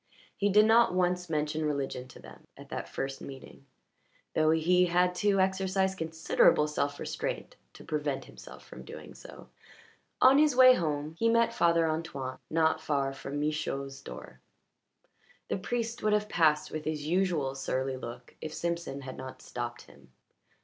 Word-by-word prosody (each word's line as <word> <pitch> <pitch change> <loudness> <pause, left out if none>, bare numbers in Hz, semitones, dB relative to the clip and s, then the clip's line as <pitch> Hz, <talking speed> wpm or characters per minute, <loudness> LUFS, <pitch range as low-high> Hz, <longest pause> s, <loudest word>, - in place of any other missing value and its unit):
He 205 - +1
did 210 +2 +6
not 225 -3 +5
once 180 -1 0
mention 155 0 -1
religion 140 -4 -2
to 125 - -14
them - - -14
at - - -13
that - - -5
first 135 0 -4
meeting, 135 0 -11 0.7
though 155 0 +3
he 180 +3 +3
had 180 +1 +2
to 205 -1 +2
exercise 190 0 +1
considerable 160 -3 +2
self 145 -1 -2
restraint - - -4 0.2
to - - -13
prevent 150 -3 -2
himself 60 +1 -13
from 65 - -11
doing 75 +2 -10
so. - - -13 0.7
On 265 +2 +7
his 300 -3 +4
way 255 0 +9
home 150 -6 -2
he 230 - +3
met 230 0 +3
Father 170 -3 +3
Antoine 150 -5 -4
not 160 0 +2
far 140 -2 -1
from 135 +1 -5
Michaud's 140 -2 -3
door. - - -10 1.1
The - - 0
priest 230 +4 -3
would 215 0 +2
have 210 0 +1
passed 155 -6 +2
with 155 0 -5
his 150 -2 -3
usual 170 -5 +1
surly 135 0 -2
look 120 -1 -9
if 155 - -6
Simpson 170 -5 -3
had 130 -1 -8
not 130 0 -8
stopped 120 -1 -5
him. - - -19
155 Hz, 160 wpm, -30 LUFS, 135-185 Hz, 1.1 s, way